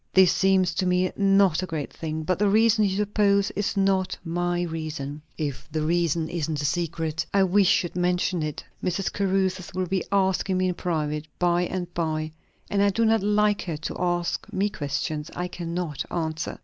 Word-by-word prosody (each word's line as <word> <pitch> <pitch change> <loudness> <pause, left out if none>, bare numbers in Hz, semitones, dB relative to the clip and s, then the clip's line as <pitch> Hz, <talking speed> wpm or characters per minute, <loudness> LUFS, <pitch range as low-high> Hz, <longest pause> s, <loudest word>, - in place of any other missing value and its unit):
"This 190 -1 +7
seems 190 -2 +3
to 185 +2 0
me 180 0 +2
not 195 -4 +4
a 185 - -3
great 160 -4 -4
thing. 160 -1 -4
But 185 +3 0
the 205 -1 +3
reason 220 +1 +4
you 190 -1 0
suppose 200 -1 +2
is 205 +1 -2
not 195 -1 +1
my 175 +1 -1
reason." 155 -3 -5 0.2
"If 145 -4 -4
the 155 0 -1
reason 165 0 +1
isn't 160 -2 -2
a 145 - -2
secret, 160 0 -1
I 195 - +5
wish 190 0 +4
you'd 175 - -6
mention 180 0 +1
it; 155 -1 -4 0.2
Mrs. 185 +1 -1
Caruthers 190 -2 0
will 185 0 0
be 190 +1 -1
asking 190 -1 +2
me 185 0 +2
in - - 0
private, 155 -3 -2
by 175 0 +2
and 175 -2 -4
by; 155 -2 -2 0.4
and 200 - +1
I 200 - +5
do 225 +3 +1
not 225 -1 +3
like 210 0 +2
her 165 -4 -3
to 155 - -5
ask 175 -1 -1
me 200 +2 0
questions 150 -1 -3
I 180 - -2
cannot 170 -4 -4
answer." 160 -2 -3
180 Hz, 190 wpm, -25 LUFS, 160-195 Hz, 0.4 s, This